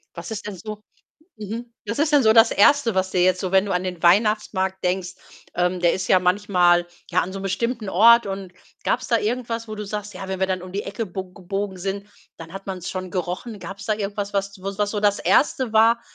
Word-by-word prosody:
Was 170 Hz, 0 st, -7 dB
ist 210 Hz, -1 st, -5 dB
denn 205 Hz, -, -5 dB
so 215 Hz, +3 st, -8 dB, 0.5 s
mhm. 225 Hz, +3 st, -6 dB, 0.2 s
Was 230 Hz, +5 st, -3 dB
ist 305 Hz, +1 st, +2 dB
denn 290 Hz, -4 st, +5 dB
so 220 Hz, -, +5 dB
das 225 Hz, 0 st, +6 dB
1., 230 Hz, 0 st, +4 dB
was 190 Hz, 0 st, 0 dB
dir 180 Hz, -1 st, +2 dB
jetzt 185 Hz, 0 st, +3 dB
so, 185 Hz, -1 st, -3 dB
wenn 190 Hz, +1 st, +4 dB
du 195 Hz, -, -3 dB
an 180 Hz, 0 st, 0 dB
den 180 Hz, -2 st, -5 dB
Weihnachtsmarkt 190 Hz, 0 st, +2 dB
denkst 180 Hz, 0 st, -1 dB, 0.4 s
ähm, 180 Hz, +1 st, 0 dB
der 170 Hz, -1 st, +3 dB
ist 185 Hz, 0 st, -3 dB
ja 185 Hz, -, +6 dB
manchmal, 180 Hz, -2 st, +3 dB, 0.3 s
ja, -, -, +3 dB
an 185 Hz, -, -4 dB
so 195 Hz, -, -5 dB
'nem 195 Hz, -, -7 dB
bestimmten 225 Hz, +3 st, -2 dB
Ort 235 Hz, +5 st, +6 dB
und 195 Hz, -2 st, -5 dB, 0.3 s
gab's 255 Hz, -, 0 dB
da 230 Hz, -, +3 dB
irgendwas, 230 Hz, 0 st, -3 dB
wo 215 Hz, -, -5 dB
du 210 Hz, 0 st, -5 dB
sagst: 210 Hz, 0 st, -5 dB
„Ja, 190 Hz, -, -7 dB
wenn 190 Hz, -1 st, -4 dB
wir 190 Hz, -, +1 dB
dann 185 Hz, -1 st, -2 dB
um 185 Hz, 0 st, -9 dB
die 200 Hz, -, -2 dB
Ecke 220 Hz, +3 st, -4 dB
bo 185 Hz, -1 st, -7 dB
gebogen 195 Hz, +1 st, -4 dB
sind, 195 Hz, +2 st, -4 dB, 0.3 s
dann 165 Hz, 0 st, -10 dB
hat 195 Hz, 0 st, -9 dB
man's 185 Hz, -2 st, -5 dB
schon 185 Hz, -1 st, -5 dB
gerochen?” 185 Hz, +4 st, -4 dB
Gab's 195 Hz, 0 st, -8 dB
da 215 Hz, -, +1 dB
irgendwas, 205 Hz, 0 st, -4 dB
was, 200 Hz, 0 st, 0 dB
was -, -, -17 dB
wo's 195 Hz, 0 st, -4 dB
was 205 Hz, 0 st, +1 dB
so 210 Hz, -, -2 dB
das 205 Hz, 0 st, +2 dB
1. 260 Hz, -4 st, +2 dB
war, 230 Hz, +2 st, +5 dB
195 Hz, 240 wpm, -23 LUFS, 185-215 Hz, 0.5 s, das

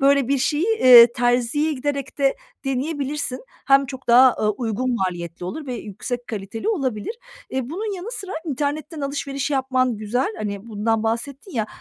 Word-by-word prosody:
böyle, 275 Hz, -2 st, +4 dB
bir 280 Hz, 0 st, +2 dB
şeyi, 295 Hz, +6 st, +1 dB, 0.2 s
iii, 240 Hz, -2 st, +10 dB
terziye 245 Hz, +6 st, +1 dB
giderek 280 Hz, -1 st, -3 dB
de 275 Hz, -1 st, +2 dB, 0.3 s
deneyebilirsin. 275 Hz, -1 st, -2 dB, 0.2 s
Hem 275 Hz, 0 st, +5 dB
çok 260 Hz, -1 st, -9 dB
daha, 250 Hz, +1 st, +7 dB
ııı, 210 Hz, -, +2 dB
uygun 240 Hz, +3 st, -2 dB
maliyetli 175 Hz, -4 st, -3 dB
olur 285 Hz, -, -5 dB
ve 255 Hz, -, -3 dB
yüksek 240 Hz, +3 st, -5 dB
kaliteli 215 Hz, -, -5 dB
olabilir. 275 Hz, -, -2 dB, 0.3 s
Iıı, 260 Hz, -1 st, -3 dB
bunun 410 Hz, +5 st, -3 dB
yanı 370 Hz, +5 st, -6 dB
sıra 390 Hz, -5 st, -6 dB
internetten 300 Hz, +1 st, -3 dB
alışveriş 275 Hz, 0 st, -3 dB
yapman 260 Hz, -3 st, +1 dB
güzel. 245 Hz, -, -1 dB
Hani, 200 Hz, 0 st, -4 dB
bundan 220 Hz, +1 st, 0 dB
bahsettin 240 Hz, -, -3 dB
ya, 220 Hz, -3 st, -1 dB
260 Hz, 160 wpm, -22 LUFS, 230-285 Hz, 0.3 s, iii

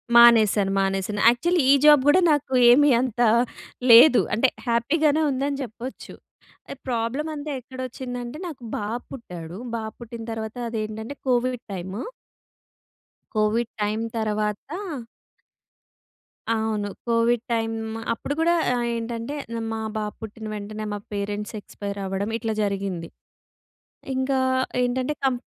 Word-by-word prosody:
మానేశాను, 220 Hz, -4 st, +7 dB
మానేశాను. 195 Hz, +2 st, -1 dB
యాక్చువలీ 340 Hz, +8 st, +2 dB
ఈ -, -, +9 dB
జాబ్ 295 Hz, -2 st, +8 dB
గూడా 360 Hz, +6 st, +6 dB
నాకు 280 Hz, -2 st, 0 dB, 0.2 s
ఏమి 290 Hz, +4 st, +6 dB
అంత 245 Hz, -2 st, -2 dB, 0.7 s
లేదు. 245 Hz, +3 st, +9 dB
అంటే, 250 Hz, +4 st, +3 dB, 0.2 s
హ్యాపీ 235 Hz, +6 st, +1 dB
గానే 305 Hz, +1 st, +4 dB
ఉందని 275 Hz, +1 st, -1 dB
చెప్పొచ్చు. 245 Hz, +2 st, -8 dB, 0.6 s
ఎహ్, 275 Hz, -, -9 dB
ప్రాబ్లమంతా 285 Hz, +6 st, -2 dB
ఎక్కడొచ్చిందంటే 255 Hz, +1 st, -6 dB
నాకు 285 Hz, -7 st, -9 dB
బాబు 220 Hz, +4 st, -3 dB
పుట్టాడు. 180 Hz, -8 st, -8 dB, 0.2 s
బాబు 220 Hz, -1 st, -5 dB
పుట్టిన 230 Hz, -1 st, -8 dB
తర్వాత 220 Hz, +1 st, -5 dB
అదేంటంటే, 220 Hz, +3 st, -4 dB
కోవిడ్ 250 Hz, -1 st, +1 dB
టైము. 190 Hz, +4 st, -5 dB, 1.3 s
కోవిడ్ 220 Hz, +2 st, +1 dB
టైమ్ 215 Hz, +2 st, 0 dB
తర్వాత 210 Hz, -1 st, 0 dB, 2.0 s
అవును. 220 Hz, -2 st, -1 dB, 0.2 s
కోవిడ్ 230 Hz, 0 st, +2 dB
టైమ్ 225 Hz, -1 st, 0 dB, 0.4 s
అప్పుడు 255 Hz, +5 st, -4 dB
గూడా 340 Hz, +1 st, +3 dB, 0.2 s
ఆహ్, 245 Hz, -1 st, 0 dB
ఏంటంటే 230 Hz, +3 st, -4 dB, 0.4 s
మా 225 Hz, -, -3 dB, 0.2 s
బాబు 210 Hz, -1 st, -3 dB
పుట్టిన 220 Hz, 0 st, -8 dB
వెంటనే 215 Hz, +1 st, -6 dB
మా 205 Hz, -, -3 dB
పేరెంట్స్ 205 Hz, +1 st, -3 dB
ఎక్స్పైరవ్వడం 200 Hz, 0 st, -4 dB
ఇట్లా 225 Hz, -1 st, -2 dB
జరిగింది. 195 Hz, -4 st, -2 dB, 1.1 s
ఇంకా 260 Hz, +1 st, +1 dB, 0.4 s
ఏంటంటే 255 Hz, +3 st, 0 dB
కంప్ 250 Hz, -2 st, +1 dB
230 Hz, 115 wpm, -24 LUFS, 210-255 Hz, 2.0 s, ఈ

